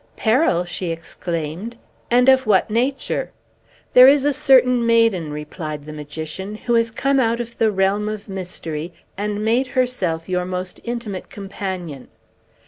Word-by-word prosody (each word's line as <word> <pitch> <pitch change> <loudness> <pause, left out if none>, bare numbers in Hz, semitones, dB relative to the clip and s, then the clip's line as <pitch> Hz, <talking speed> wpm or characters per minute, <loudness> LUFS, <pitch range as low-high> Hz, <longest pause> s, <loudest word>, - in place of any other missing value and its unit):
"Peril!" 220 - +2
she 175 0 -4
exclaimed. 165 +4 -5 0.3
"And 245 +1 +4
of 265 -2 +5
what 205 0 +3
nature?" 255 +5 -1 0.6
"There 250 +1 +9
is 280 0 +5
a 290 - +3
certain 255 -4 +4
maiden," 230 -9 +2
replied 150 0 -6
the 155 - -8
magician, 160 +7 -6
"who 240 +2 -2
has 230 0 +3
come 270 +4 +1
out 235 -1 +1
of 235 0 -7
the 220 -1 +3
realm 200 +2 +1
of 215 -1 -6
mystery, 175 -4 -5 0.2
and 210 +1 -3
made 240 +4 +2
herself 245 -11 -1
your 180 -1 0
most 180 0 -5
intimate 235 -5 -5
companion. 190 - -6
205 Hz, 145 wpm, -21 LUFS, 175-240 Hz, 0.6 s, There